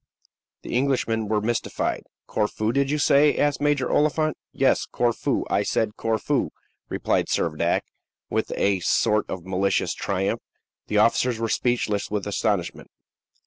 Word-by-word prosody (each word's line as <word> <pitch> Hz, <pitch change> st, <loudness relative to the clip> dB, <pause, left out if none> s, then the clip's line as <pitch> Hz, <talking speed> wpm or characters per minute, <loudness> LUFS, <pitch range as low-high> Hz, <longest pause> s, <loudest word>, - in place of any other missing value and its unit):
The -, -, -4 dB
Englishmen 125 Hz, -4 st, +1 dB
were 105 Hz, 0 st, +1 dB
mystified. 115 Hz, +2 st, -2 dB, 0.2 s
"Corfu, 110 Hz, +1 st, -1 dB
did 140 Hz, +1 st, +1 dB
you 150 Hz, -, +1 dB
say?" 145 Hz, 0 st, +4 dB
asked 145 Hz, -1 st, +1 dB
Major 145 Hz, -2 st, +2 dB
Oliphant. 155 Hz, +1 st, +1 dB, 0.2 s
"Yes, 135 Hz, -1 st, +2 dB
Corfu; 120 Hz, -2 st, 0 dB
I -, -, +1 dB
said 110 Hz, -1 st, 0 dB
Corfu," 110 Hz, -3 st, 0 dB, 0.4 s
replied -, -, 0 dB
Servadac, -, -, 0 dB, 0.5 s
with -, -, -2 dB
a 100 Hz, -1 st, +2 dB
sort 105 Hz, +4 st, +1 dB
of 90 Hz, -2 st, -5 dB
malicious 95 Hz, +1 st, 0 dB
triumph. 95 Hz, 0 st, -1 dB, 0.5 s
The 105 Hz, -, 0 dB
officers 115 Hz, +2 st, +3 dB
were 115 Hz, 0 st, -1 dB
speechless 115 Hz, -5 st, 0 dB
with 105 Hz, -1 st, -2 dB
astonishment. 100 Hz, -3 st, -1 dB
115 Hz, 135 wpm, -24 LUFS, 105-135 Hz, 0.5 s, say